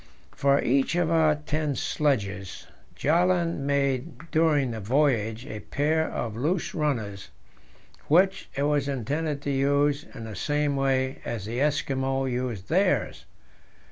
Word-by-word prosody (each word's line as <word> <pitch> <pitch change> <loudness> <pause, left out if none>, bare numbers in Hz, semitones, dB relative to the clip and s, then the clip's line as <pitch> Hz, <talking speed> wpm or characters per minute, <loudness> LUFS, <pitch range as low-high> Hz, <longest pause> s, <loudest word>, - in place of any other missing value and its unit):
For 140 0 +2
each 135 +5 +2
of 175 -2 +1
our 160 -2 +4
ten 150 -1 -2
sledges, 100 -13 -1 0.3
Bjaaland 170 +1 +2
made 140 +2 -1
during 150 -5 +2
the 115 - -5
voyage 115 -1 +1
a 110 -6 -6
pair 155 +6 0
of 110 -3 -4
loose 160 +9 -1
runners, 110 -11 -2 0.8
which 190 +5 +3
it 140 - 0
was 145 -1 +1
intended 140 +3 -2
to 145 - -1
use 140 +1 +1
in 115 - -7
the 110 -2 -7
same 145 +5 0
way 135 -1 0
as 110 -4 -4
the 115 +3 -3
Eskimo 135 -2 0
use 125 -6 -2
theirs. 185 - 0
140 Hz, 135 wpm, -26 LUFS, 125-150 Hz, 0.8 s, our